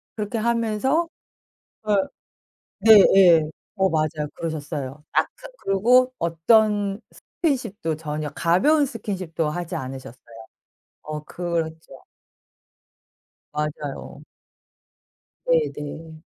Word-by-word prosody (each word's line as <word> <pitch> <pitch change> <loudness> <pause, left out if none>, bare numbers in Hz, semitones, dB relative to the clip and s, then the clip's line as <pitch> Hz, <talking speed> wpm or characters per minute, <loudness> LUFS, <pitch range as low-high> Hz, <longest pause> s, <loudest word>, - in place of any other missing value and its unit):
그렇게 210 +1 -3
하면서 235 +7 +1 0.8
예. 200 -2 0 0.9
네예. 170 -5 +6 0.3
어 190 -2 +2
맞아요. 155 -2 -1
그러셨어요. 150 -3 -5
아 - - +4
그 - - -11 0.2
그리고 250 +6 +3
어떤 200 +4 +2 0.4
스킨십도 230 - -1
전혀 150 -1 -4
가벼운 280 - +3
스킨십도 185 - -3
하지 175 +2 -4
않으셨어요. 130 -1 -7 0.8
어 150 0 -6
그렇죠. 160 -5 -4 1.5
맞아요. 150 -1 -5 1.2
네네. 160 - -2
170 Hz, 200 characters per minute, -23 LUFS, 155-220 Hz, 1.5 s, 네예